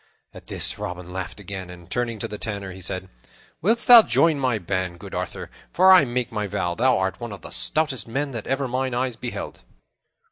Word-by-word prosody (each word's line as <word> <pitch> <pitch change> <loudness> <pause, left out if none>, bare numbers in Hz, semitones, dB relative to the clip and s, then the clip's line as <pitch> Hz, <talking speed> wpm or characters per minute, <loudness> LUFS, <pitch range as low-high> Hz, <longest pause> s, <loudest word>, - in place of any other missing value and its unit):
At - - -13
this - - -1
Robin 90 0 -6
laughed 95 +1 -5
again, 95 -2 -7
and, 85 -1 -12
turning 120 -2 -2
to - - -3
the 105 - -8
Tanner, 100 -3 -5
he 95 +1 -10
said, 95 +1 -5 0.5
"Wilt 225 +7 +2
thou 240 -2 +11
join 165 -7 +2
my 130 -4 +1
band, 90 -2 -3
good - - -10
Arthur? - - -5 0.2
For 185 +2 +6
I 185 -5 +8
make 125 0 -2
my 105 -2 -2
vow 90 -3 -2
thou 125 +6 +3
art 95 0 -1
one 120 -2 -6
of 100 -4 -9
the - - -9
stoutest 150 -6 +1
men 140 +5 -2
that 115 -4 -6
ever 135 0 0
mine 130 0 -2
eyes 125 -1 -1
beheld." 120 +1 -6
115 Hz, 210 wpm, -23 LUFS, 95-130 Hz, 0.5 s, thou